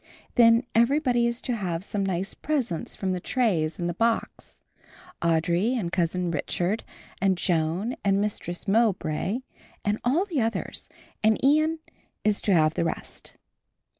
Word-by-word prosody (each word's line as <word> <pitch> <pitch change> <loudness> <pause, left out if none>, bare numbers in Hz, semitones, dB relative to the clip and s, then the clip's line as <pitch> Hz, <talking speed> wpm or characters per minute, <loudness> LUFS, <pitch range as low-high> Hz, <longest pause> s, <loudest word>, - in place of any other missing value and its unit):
Then 230 0 +6
everybody 240 0 +3
is 235 0 -2
to 245 - -2
have 180 -5 -3
some 200 0 -2
nice 190 0 -2
presents 260 - -2
from 190 -1 -2
the 180 - -1
trays 175 -9 0
and 175 - -2
the 175 - -1
box, 230 +5 -2 0.6
Audry 170 +7 +2
and 200 -9 -2
Cousin 175 0 0
Richard, 175 +6 -1 0.4
and 195 -2 +3
Joan 175 +7 0
and 195 -1 +3
Mistress 200 -3 -3
Mowbray 200 -1 +1 0.4
and 210 +1 +1
all 295 +11 +2
the 330 -10 -1
others, 225 0 -3 0.3
and 220 0 +4
Ian 310 +3 +4 0.5
is 210 -1 +2
to 205 - 0
have 155 -3 +4
the - - 0
rest." 165 - -5
200 Hz, 145 wpm, -26 LUFS, 175-235 Hz, 0.6 s, Then